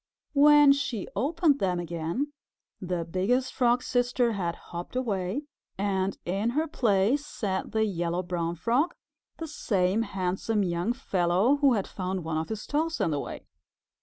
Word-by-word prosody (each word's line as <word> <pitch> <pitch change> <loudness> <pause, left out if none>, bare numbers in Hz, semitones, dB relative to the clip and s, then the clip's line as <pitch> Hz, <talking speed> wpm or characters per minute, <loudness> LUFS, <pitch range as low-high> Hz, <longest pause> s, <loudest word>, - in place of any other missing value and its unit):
When 295 0 +7
she 270 -7 -1
opened 295 - +2
them 180 -2 0
again, 170 - -3 0.5
the 180 -2 -2
Biggest 200 +10 0
Frog's 245 0 +2
Sister 245 -1 +1
had 175 -5 -2
hopped 175 +6 -8
away, 215 0 -1 0.3
and 195 -1 0
in 195 +6 0
her 315 - +2
place 230 +1 +2
sat 195 -9 -3
the 220 0 +2
Yellow 175 -2 -1
Brown 170 -1 -2
Frog, 240 - +1 0.4
the 325 - -5
same 200 -8 0
handsome 195 +1 -1
young 175 +4 0
fellow 195 0 +2
who 280 -3 +4
had 200 -4 0
found 185 -1 -4
one 160 -1 -2
of 160 - -4
his 220 -1 -4
toes 320 +3 -1
in 165 - +1
the 145 - 0
way. - - -7
205 Hz, 155 wpm, -27 LUFS, 180-260 Hz, 0.5 s, When